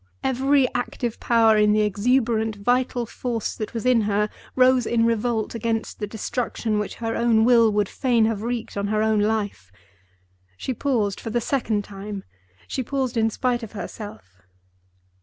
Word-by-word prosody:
Every 270 +1 +3
active 245 -1 -3
power 225 -2 +4
in 210 0 +4
the 215 - +3
exuberant 220 +1 +1
vital 245 +3 0
force 230 0 -3
that 215 +1 -6
was 230 - -3
in 250 -2 +4
her 210 0 0 0.2
rose 255 -1 +4
in 230 -1 +2
revolt 230 -1 0
against 230 -1 -2
the 210 - -3
destruction 220 0 -2
which 210 - -4
her 225 -1 -3
own 230 -1 +3
will 230 -2 +5
would 205 -1 +1
fain 240 -2 +2
have 220 -2 -1
wreaked 235 0 -4
on 200 0 -1
her 215 +1 +1
own 220 -1 +2
life. 205 - -1 0.9
She 260 - -3
paused: 225 -6 0
for - - -6
the 240 +2 0
second 230 -4 -1
time, 200 0 -7 0.4
she 265 - -2
paused 260 -1 -2
in 225 -1 +2
spite 245 +2 -1
of 225 -2 -8
herself. 180 - -9
225 Hz, 165 wpm, -23 LUFS, 210-245 Hz, 0.9 s, will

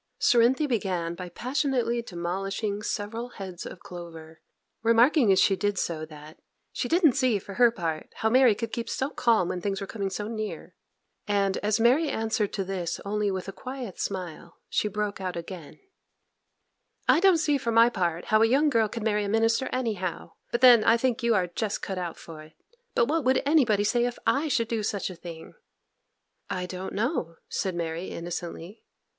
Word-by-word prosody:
Cerinthy 260 +2 +4
began 185 -10 -1
by 180 +1 -7
passionately 245 - -1
demolishing 195 +2 -3
several 225 +4 -4
heads 190 -6 -8
of 175 - -10
clover, 165 -2 -10 0.4
remarking 230 +2 +4
as 190 - +4
she 195 - +4
did 205 0 -1
so 155 -3 -2
that 150 0 -13 0.3
'she - - -2
didn't 330 0 +4
see, 255 -5 +2
for 200 +1 -9
her 240 +3 +5
part, 165 -8 -4
how 220 - 0
Mary 255 -3 +5
could 225 +2 -4
keep 230 0 -3
so 265 +2 -2
calm 225 -7 +2
when 180 - -3
things 195 +1 -2
were 200 - -4
coming 200 -1 -3
so 205 +2 -4
near;' 215 -1 -5 0.5
and 200 -2 +1
as 210 +2 0
Mary 265 +7 +4
answered 220 -3 -1
to 195 - -1
this 180 -3 -3
only 210 0 0
with 190 -1 -3
a - - -4
quiet 255 -2 -7
smile, 175 -3 -5
she - - 0
broke 210 -1 -3
out 185 -1 -3
again:— 170 -2 -8 1.3
'I - - +5
don't 375 -1 +5
see, 295 -3 +1
for 235 -3 -2
my 230 +1 +6
part, 175 -7 -1
how 215 0 +3
a 225 - +6
young 285 +5 +3
girl 225 -3 +3
could 225 +1 -6
marry 210 -1 +1
a 200 - -3
minister 225 +4 +2
anyhow; 210 -9 -3 0.2
but 235 - -1
then 245 -4 +8
I 230 - +5
think 245 -1 0
you 235 -1 +2
are 185 -3 +2
just 200 +4 -3
cut 190 -2 -3
out 175 -2 -4
for 160 -2 -10
it. 155 0 -15 0.4
But 235 - +4
what 320 +2 0
would 260 +1 +2
anybody 250 -9 +3
say 240 +3 +2
if 245 -1 -3
I 295 +3 +2
should 235 -5 +1
do 230 -1 -1
such 205 -2 -2
a - - -9
thing?' 165 -1 -10 1.0
'I 180 -1 -2
don't 185 +1 -6
know,' 205 - -1
said 190 -3 -2
Mary, 165 +1 -3
innocently. 175 +3 -6
210 Hz, 190 wpm, -27 LUFS, 180-235 Hz, 1.3 s, then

